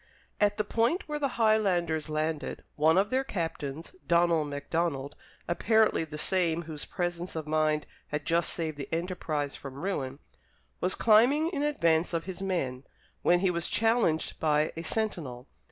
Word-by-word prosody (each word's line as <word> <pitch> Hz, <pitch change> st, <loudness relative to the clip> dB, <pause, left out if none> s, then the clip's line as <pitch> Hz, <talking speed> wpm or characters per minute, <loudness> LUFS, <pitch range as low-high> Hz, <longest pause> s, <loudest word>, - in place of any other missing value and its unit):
At 205 Hz, 0 st, +3 dB
the 215 Hz, -, +1 dB
point 235 Hz, -, 0 dB
where 300 Hz, -1 st, -3 dB
the 280 Hz, -3 st, -2 dB
Highlanders 180 Hz, -9 st, +2 dB
landed, 155 Hz, 0 st, -2 dB
one 160 Hz, +3 st, +4 dB
of 200 Hz, +2 st, +2 dB
their 260 Hz, +1 st, +2 dB
captains, 165 Hz, -, -4 dB
Donald 170 Hz, -3 st, +3 dB
Macdonald, 145 Hz, -1 st, -2 dB, 0.3 s
apparently 220 Hz, +1 st, +3 dB
the 150 Hz, -1 st, -8 dB
same 170 Hz, 0 st, +1 dB
whose 155 Hz, -2 st, -5 dB
presence 175 Hz, 0 st, -3 dB
of 155 Hz, -1 st, -4 dB
mind 155 Hz, 0 st, +1 dB, 0.2 s
had 150 Hz, 0 st, -3 dB
just 170 Hz, 0 st, +1 dB
saved 160 Hz, -3 st, -3 dB
the 140 Hz, -, -6 dB
enterprise 160 Hz, -4 st, -2 dB
from 135 Hz, -2 st, -8 dB
ruin, 140 Hz, -5 st, -3 dB, 0.6 s
was 180 Hz, -, 0 dB
climbing 250 Hz, +9 st, +5 dB
in 290 Hz, -6 st, -2 dB
advance 170 Hz, -, +2 dB
of 165 Hz, -, -1 dB
his 190 Hz, +2 st, -7 dB
men, 140 Hz, -10 st, -2 dB, 0.4 s
when 175 Hz, 0 st, +4 dB
he 190 Hz, -2 st, +3 dB
was 170 Hz, -1 st, -2 dB
challenged 225 Hz, -8 st, +1 dB
by 150 Hz, -1 st, +2 dB
a 165 Hz, -, -4 dB
sentinel. 160 Hz, -, -3 dB
170 Hz, 155 wpm, -29 LUFS, 155-205 Hz, 0.6 s, climbing